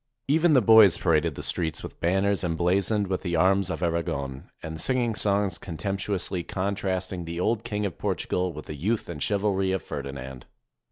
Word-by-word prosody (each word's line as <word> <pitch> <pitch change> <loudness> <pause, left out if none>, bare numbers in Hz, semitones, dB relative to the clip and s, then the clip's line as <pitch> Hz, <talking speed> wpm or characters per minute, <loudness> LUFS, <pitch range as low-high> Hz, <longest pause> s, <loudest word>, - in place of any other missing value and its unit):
Even 160 +3 +4
the 130 -5 +5
boys 110 -5 +7
pa 90 - -2
raded 80 -1 +2
the 75 - -6
streets 80 +3 -2
with - - -9
banners 95 +3 +1
emblazoned 90 +4 +1
with 95 -1 -2
the 85 -2 -2
arms 95 +2 +3
of 90 - -3
Aragon, 70 -6 -2
and 80 0 -5
singing 125 -1 0
songs 100 -2 0
contemptuously 95 +1 -3
contrast 95 0 -2
ing 90 -2 -5
the 85 +1 -5
old 110 +4 0
King 105 -3 -2
of 95 - -5
Portugal 90 0 -1
with 75 -1 -9
the - - -6
youth 100 +10 -1
and 80 -4 -6
chivalry 100 -2 +1
of 95 -3 -1
Ferdinand. 65 -2 -7
95 Hz, 180 wpm, -26 LUFS, 85-100 Hz, -, boys